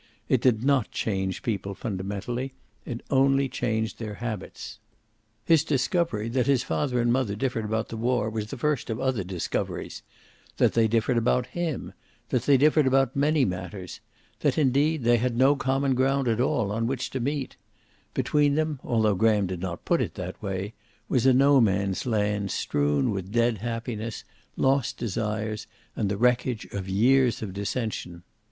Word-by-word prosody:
It 130 - +2
did 120 -3 +2
not 135 -4 +2
change 95 -3 -2
people 100 -3 -2
fundamentally. 110 +6 -4 0.3
It 120 0 -4
only 135 0 +3
changed 110 -3 -2
their 110 -2 -5
habits. 115 -3 -6 0.7
His 165 -2 +5
discovery 140 - 0
that 125 +1 0
his 135 -3 +3
father 130 -4 -1
and 120 0 +2
mother 125 -6 0
differed 115 -1 -2
about 110 +1 -2
the 115 - -5
war 120 -1 +1
was 110 -1 -3
the 135 - -7
first 150 +1 -1
of 110 +1 -2
other 130 -6 0
discoveries; 90 -2 -4 0.6
that - - +3
they 115 -1 +4
differed 115 +2 +1
about 125 +2 +1
him; 170 -6 -3 0.4
that 125 - +1
they 140 -2 +6
differed 150 +1 +4
about 135 -1 +2
many 145 0 +3
matters; 90 0 -5 0.4
that, - - +1
indeed, 145 +1 +2
they 120 +1 +4
had 120 0 -1
no 135 +3 +5
common 135 0 +1
ground 135 +1 +1
at 115 0 +1
all 125 -7 +1
on 115 +2 -1
which 130 0 -3
to 130 - -3
meet; 140 +2 -2 0.6
between 145 -1 +2
them, 155 -2 -1
although 110 -3 +2
Graham 105 0 +3
did 90 -1 -4
not 90 -1 -5
put - - +2
it - - -3
that - - -6
way, 95 +2 -4 0.4
was 130 -1 +2
a - - +7
No 135 +1 +5
Man's 100 0 0
Land 105 -3 0
strewn 70 -4 0
with 95 -1 -4
dead 115 -1 +2
happiness, 115 0 -4 0.3
lost 135 -1 +1
desires, 110 -1 -3 0.3
and 100 - -1
the 100 - -1
wreckage 125 0 +1
of 95 -1 -4
years 120 +4 +3
of 100 -4 -5
dissension. 100 -4 -4
120 Hz, 170 wpm, -26 LUFS, 105-135 Hz, 0.7 s, a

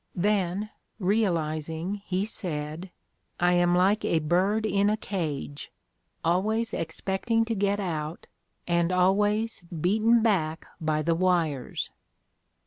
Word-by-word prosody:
Then, 200 +1 0 0.3
realizing, 175 -2 -1
he 190 0 -1
said: 165 -4 -4 0.5
'I 175 0 +4
am 175 0 +3
like 195 +4 +3
a 165 - +2
bird 185 +8 +1
in 200 0 +2
a 215 - +1
cage: 150 -8 -4 0.5
always 215 +7 +1
expecting 195 +7 -1
to 225 - -1
get 200 0 +1
out, 160 -4 -3 0.4
and 170 0 +2
always 205 +5 +2 0.2
beaten 220 +7 +3
back 165 -8 +1
by 155 -1 0
the 165 - +2
wires. 165 -6 0
185 Hz, 115 wpm, -27 LUFS, 165-210 Hz, 0.5 s, I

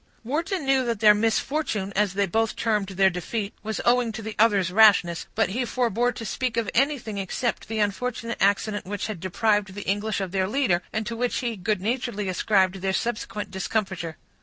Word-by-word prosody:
Wharton 325 - -2
knew 270 -1 +3
that 230 -3 -1
their 210 -1 +7
misfortune, 220 -1 -1
as 200 -2 +1
they 200 0 +2
both 225 +4 0
termed 210 -3 0
their 190 0 +3
defeat, 200 +4 -4
was 220 0 -4
owing 240 -1 +3
to 220 - -6
the 220 0 -6
other's 200 -5 +3
rashness; 195 -5 +5
but 220 -4 +2
he 240 +6 -1
forbore 245 0 0
to 225 - -6
speak 245 +4 -2
of 225 -3 0
anything 255 -6 0
except 215 +6 -2
the 225 +1 -3
unfortunate 230 +3 -2
accident 205 0 +1
which 205 +1 -3
had 215 -5 -5
deprived 205 +2 0
the 205 - -7
English 205 +2 0
of 190 -2 -3
their 190 -1 0
leader, 210 -7 +1
and 220 0 -2
to 230 +1 -4
which 245 +1 -1
he 235 -2 -2
good 200 0 -1
naturedly 225 -2 -2
ascribed 190 0 +2
their 190 0 0
subsequent 210 -2 -3
discomfiture. 190 -4 -3
215 Hz, 190 wpm, -25 LUFS, 195-235 Hz, -, their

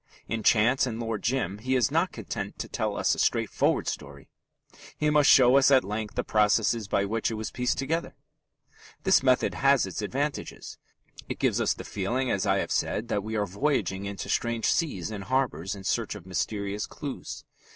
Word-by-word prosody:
In 115 -1 -2
Chance 120 +5 +3
and 115 -2 -4
Lord 115 -3 -3
Jim 115 -6 -1
he 130 +4 -1
is 125 -5 +2
not - - +1
content - - -6
to - - -5
tell - - -2
us - - +2
a - - -4
straightforward - - +1
story: 70 -1 -6 0.7
he 150 0 +1
must 150 -1 +5
show 130 0 +7
us 140 - +5
at 135 -2 +5
length 105 +1 -4
the - - 0
processes 110 +1 +2
by 100 0 +1
which 110 +2 -1
it 115 - -3
was 110 0 -5
pieced 125 0 -1
together. 160 +5 -2 0.9
This 190 -1 +5
method 130 -1 +2
has 135 -4 +3
its 95 +2 -5
advantages. 140 +7 -4 0.5
It - - -3
gives - - +1
us - - +1
the - - -8
feeling, 120 +6 -2
as 100 +1 0
I 95 0 +3
have - - -2
said, 115 +3 -1
that 100 - 0
we 110 +1 -4
are 105 -1 +1
voyaging 100 - -1
into 100 -1 -5
strange 115 -1 -1
seas 110 - 0
and 100 -3 -6
harbours 105 - -1
in 100 - -10
search 110 +2 -1
of 100 -4 -10
mysterious 100 +3 -3
clues. 145 -3 -7
110 Hz, 195 wpm, -27 LUFS, 100-130 Hz, 0.9 s, show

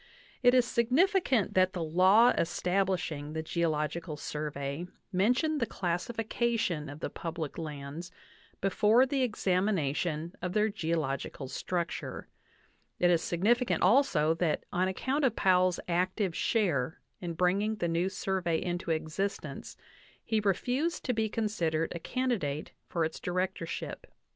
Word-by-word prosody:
It 245 0 +6
is 250 -1 +5
significant 260 - +2
that 185 0 +3
the 175 -3 -2
law 185 +9 +5
establishing 175 -4 -1
the 160 0 -3
Geological 160 -1 -1
Survey 150 +1 -4 0.2
mentioned 250 - +2
the. 230 - 0
classification 210 - -1
of 145 +2 -9
the - - -2
public 165 -3 -5
lands 150 +2 -6 0.5
before 210 +6 +4
the 270 0 0
ex 240 -4 -2
amination 170 -4 0
of 180 0 -3
their 215 +1 +3
geological 160 -8 -2
structure. 170 +5 -3 0.7
It 175 0 +4
is 170 -2 +3
significant 230 +8 +1
also 180 - +4
that 165 -2 0
on 185 +1 +2
account 265 +10 -1
of 250 -4 +2
Powell's 185 -1 +3
active 180 +1 0
share 160 - 0 0.2
in 175 -2 -4
bringing 195 +5 +1
the 175 -5 -1
new 170 +3 +1
Survey 185 -4 -1
into 175 -1 -3
existence 160 +6 -3 0.5
he 220 - +1
refused 250 - 0
to 250 - +1
be 220 -1 0
considered 175 -8 -1
a 170 - -5
candidate 195 - -2 0.2
for 165 -2 +1
its 160 - -5
directorship. 180 -1 -3
180 Hz, 130 wpm, -30 LUFS, 165-220 Hz, 0.7 s, It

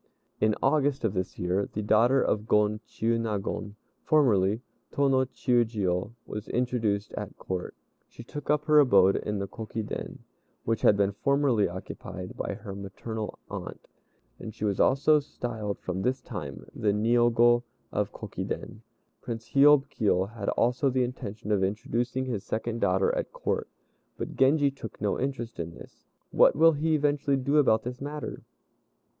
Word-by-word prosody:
In 110 -1 +3
August, 140 -1 +2
of 105 - 0
this 95 -2 -3
year, 90 +3 -1
the 105 - -3
daughter 120 +6 +4
of 105 +1 -1
Gon 105 0 +2
Chiûnagon 105 -2 -2 0.3
(formerly 110 - +3 0.3
Tô 140 0 +2
no 130 0 +3
Chiûjiô) 110 -6 0
was 105 0 -6
introduced 115 -5 -1
at - - -6
Court. 90 -1 -5 0.3
She 120 - -12
took 145 +4 -8
up 150 0 +2
her 155 -1 +6
abode 100 -9 +5
in 105 0 -3
the 100 0 -3
Kokiden, 110 0 -6 0.4
which 115 -1 -1
had 105 - +5
been 100 -1 +2
formerly 135 -1 +2
occupied 90 0 -8
by - - -3
her 100 -2 -8
maternal 105 +3 -6
aunt, - - -8 0.5
and 110 -1 -8
she 110 - -3
was 100 -2 0
also 145 +3 +4
styled 115 -7 -5
from 95 +1 -4
this 130 +5 0
time 90 - -7
the 105 - +1
Niogo 120 +2 +4 0.3
of - - -1
Kokiden. - - -6 0.4
Prince 115 -2 -6
Hiôb 140 0 +6
Kiô 100 -1 0
had 105 -4 -3
also 125 +4 +2
the 130 0 +1
intention 110 -4 -5
of 100 -2 +2
introducing 120 +6 -1
his 115 -6 -3
second 115 +1 -3
daughter 470 - +2
at - - -3
Court, - - -2 0.5
but - - -5
Genji 140 +1 +4
took 135 -5 -9
no 105 -2 -1
interest 125 -5 -3
in 85 0 -5
this. - - -15 0.2
What - - +5
will 165 +3 +6
he 155 +1 +1
eventually 145 -1 +1
do 140 +3 +1
about 110 -7 +4
this 125 +2 -6
matter? 150 +1 -5
115 Hz, 155 wpm, -28 LUFS, 105-135 Hz, 0.5 s, her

